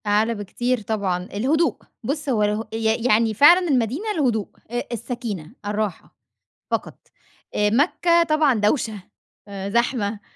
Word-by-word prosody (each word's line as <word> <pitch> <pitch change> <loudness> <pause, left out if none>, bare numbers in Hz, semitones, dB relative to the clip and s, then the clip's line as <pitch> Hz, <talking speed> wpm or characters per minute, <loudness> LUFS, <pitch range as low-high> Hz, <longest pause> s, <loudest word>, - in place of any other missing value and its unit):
أعلى 215 +3 +2
بكتير 240 +4 -2
طبعًا، 200 -4 -2
الهدوء 265 - +1 0.3
بُص، 290 +5 -3
هو 220 -5 +2
اله 210 +2 0
ي 225 +1 0
يعني 220 -1 +3
فعلًا 345 - +6
المدينة 275 - 0
الهدوء، 240 - 0 0.2
أ 240 0 -1
السكينة، 230 - -5
الراحة، 205 -3 -3 0.6
فقط. - - -3 0.6
آآ، 210 0 +2
مكة 340 - +3
طبعًا 305 -4 +3
دوشة، 215 -1 0 0.5
آآ 195 -1 -5
زحمة، 225 -2 0
225 Hz, 130 wpm, -22 LUFS, 210-270 Hz, 0.6 s, فعلًا